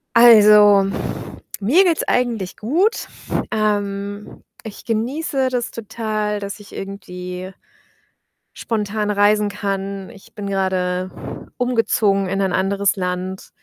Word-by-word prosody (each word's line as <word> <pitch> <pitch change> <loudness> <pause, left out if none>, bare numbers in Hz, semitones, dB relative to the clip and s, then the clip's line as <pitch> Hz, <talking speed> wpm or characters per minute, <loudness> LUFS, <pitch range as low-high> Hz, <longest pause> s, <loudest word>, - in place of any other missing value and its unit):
Also, 210 -3 +8 0.8
mir 260 - +4
geht's 335 -3 +2
eigentlich 230 -7 0
gut. 340 - 0 0.4
Ähm, 205 -1 -2 0.2
ich 215 -2 -9
genieße 260 +4 -1
das 245 -2 -2
total, 215 -1 -3
dass 200 +1 -6
ich 205 - -14
irgendwie 185 -1 -7 1.0
spontan 210 -1 -2
reisen 205 +1 +3
kann. 195 -1 -4
Ich 200 -4 -17
bin 205 -2 -5
grade 185 -1 -1 0.5
umgezogen 220 -5 +1
in 195 +1 -1
ein 190 -2 0
anderes 195 +1 +1
Land, 185 0 -4
205 Hz, 105 wpm, -20 LUFS, 195-225 Hz, 1.0 s, Also